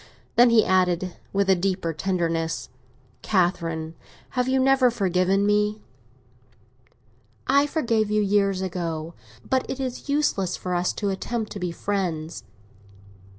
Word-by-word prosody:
Then 240 +1 +7
he 230 -2 +5
added, 185 -1 +1 0.2
with 200 0 +1
a 190 - +6
deeper 180 -2 -1
tenderness, 165 -1 -1 0.5
"Catherine, 165 -4 0 0.4
have 250 -1 -1
you 265 0 +2
never 265 -1 +4
forgiven 195 -2 +1
me?" 210 +1 +1 1.6
"I 280 +2 +4
forgave 230 -9 0
you 210 0 +2
years 195 -1 +1
ago, 170 -3 -4 0.3
but 260 -1 +1
it 270 - -4
is 260 +1 -5
useless 245 -11 +1
for 180 - -4
us 175 0 +1
to 205 -2 -2
attempt 220 +3 -3
to 200 - -6
be 180 -2 -2
friends." 170 -4 -3
195 Hz, 130 wpm, -24 LUFS, 175-230 Hz, 1.6 s, Then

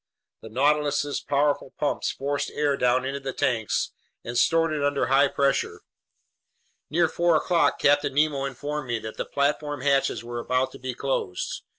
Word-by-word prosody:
The 110 - -10
Nautilus's 145 +3 +1
powerful 145 -1 0
pumps 145 - -1
forced 140 +1 -2
air 145 -1 +1
down 125 0 +2
into 135 +1 -3
the 135 -1 -5
tanks 115 -4 0 0.3
and 120 - -6
stored 165 +6 +3
it 150 -2 -2
under 145 -1 +1
high 135 +2 +4
pressure. 140 0 0 1.1
Near 170 +2 +3
four 170 0 +2
o'clock 165 -2 +2
Captain 145 -1 +2
Nemo 145 -2 +2
informed 145 +1 -4
me 120 -1 -1
that 110 0 -8
the - - -2
platform 145 0 -1
hatches 140 -3 +1
were 120 0 -5
about 130 +2 0
to - - -12
be 130 -1 -5
closed. 130 -9 -3
140 Hz, 165 wpm, -25 LUFS, 130-145 Hz, 1.1 s, high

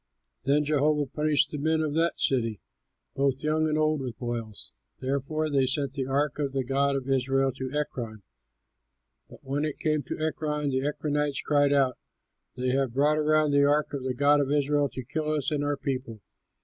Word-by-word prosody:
Then 145 +2 +3
Jehovah 150 0 +2
punished 150 +2 +1
the 150 - -4
men 160 +2 +1
of 155 -2 -1
that 165 +2 +1
city, 115 -6 +1 0.5
both 135 -1 0
young 155 +1 +1
and 155 0 0
old, 155 -1 +1
with 125 -3 -5
boils. 115 -3 -4 0.3
Therefore 140 +4 -1
they 140 -3 +2
sent 135 +1 -1
the 135 -2 -3
ark 140 +1 0
of 140 -2 -1
the 135 -1 0
God 140 +2 +1
of 135 -1 -3
Israel 135 0 +2
to 130 +1 -5
Ekron; 120 -8 -4 1.1
but - - -14
when 140 +2 -2
it 155 -2 -2
came 155 -2 0
to 130 - -6
Ekron, 150 -2 -1
the 130 0 0
Ekronites 150 -1 -1
cried 145 -1 +3
out, 135 -3 +2 0.6
"They 125 0 -1
have 130 -2 0
brought 150 +3 +3
around 155 0 +3
the 140 0 +4
ark 150 +1 +2
of 140 - -3
the 130 -1 -2
god 145 +2 +4
of 140 0 -1
Israel 145 0 +2
to 130 - -7
kill 155 +5 -3
us 150 -1 -1
and 145 -1 0
our 145 0 0
people!" 130 -6 -4
140 Hz, 190 wpm, -27 LUFS, 135-150 Hz, 1.1 s, the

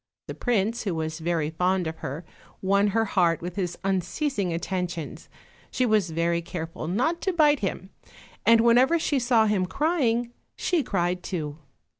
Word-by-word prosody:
The - - -6
prince, 230 -1 0
who 195 -6 -2
was 160 0 -3
very 160 -2 -1
fond 180 +2 +1
of 160 0 -4
her, 150 +6 -6 0.3
won 200 +2 +2
her 225 +2 +1
heart 175 -5 +2
with 175 +1 -6
his 180 -3 -3
unceasing 195 - -1
attentions; 170 -2 -4 0.4
she 255 - 0
was 215 -6 +2
very 170 +1 0
careful 165 -2 -6
not 255 - 0
to 380 - 0
bite 300 -5 +4
him, 190 -1 -4 0.5
and 230 +2 +6
whenever 245 +7 +5
she 295 -3 0
saw 240 -3 +3
him 200 -4 +1
crying 240 - 0 0.2
she 350 -3 +1
cried 180 -6 -1
too. 155 -5 -4
190 Hz, 160 wpm, -26 LUFS, 170-235 Hz, 0.5 s, and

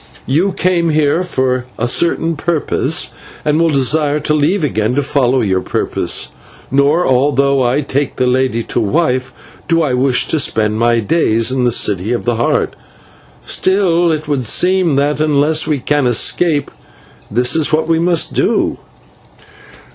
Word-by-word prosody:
You 165 +9 +1
came 175 -2 0
here 155 +1 +1
from 130 -7 -1 0.2
a 120 - -1
certain 165 +4 0
purpose 160 0 -1 0.3
and 150 +2 +1
will 165 - +3
desire 145 +1 +1
to 150 - -1
leave 155 +5 +1
again 110 -4 -1
to 145 - 0
follow 130 -2 +1
your 95 -3 0
purpose; - - -2 0.4
nor, 145 +6 +2
although 140 +1 +2
I 125 +4 +1
take 140 0 -2
this 130 - 0
lady 125 -2 0
to - - -3
wife, 130 +2 0 0.4
do 165 -1 +2
I 140 -5 -1
wish 130 0 +1
to 160 - +1
spend 110 -5 0
my 120 0 +2
days 115 -3 +1
in 130 -1 0
the 120 - +2
City 105 -1 0
of 120 - -3
the 120 -2 0
Heart. 120 - 0 0.7
And - - -1
yet 175 -3 +2
it 155 - -18
would 135 -5 -2
seem 180 - +2
that, 145 +2 0
unless 155 +1 +2
we 150 - 0
can 145 +1 0
escape, 145 +6 +1 0.6
this 125 +6 +1
is 160 -2 0
what 155 +1 +1
we 165 -1 +1
must 170 0 +1
do." - - 0
145 Hz, 160 wpm, -15 LUFS, 125-160 Hz, 0.7 s, will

